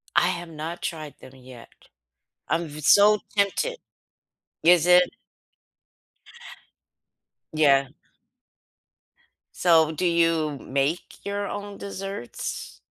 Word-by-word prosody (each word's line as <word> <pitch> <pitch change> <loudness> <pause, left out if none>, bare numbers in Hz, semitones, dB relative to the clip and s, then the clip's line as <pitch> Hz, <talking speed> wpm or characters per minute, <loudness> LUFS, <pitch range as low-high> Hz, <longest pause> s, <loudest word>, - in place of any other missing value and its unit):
I 175 - +4
have 175 -2 -4
not 160 +2 -7
tried 155 -4 -5
them 130 - -14
yet. 125 -2 -14 0.8
I'm 165 0 -1
so 205 +7 +6
v - - -26
tempted. 340 - 0 0.9
Is 175 -1 +5
it? 180 0 +6 2.4
Yeah. 140 -3 +4 1.7
So, 160 -3 +4
do 180 +4 -2
you 165 -4 +1
make 140 +9 -3
your 200 0 -3
own 205 0 -7
desserts? 195 -8 -7
170 Hz, 95 wpm, -24 LUFS, 150-195 Hz, 2.4 s, so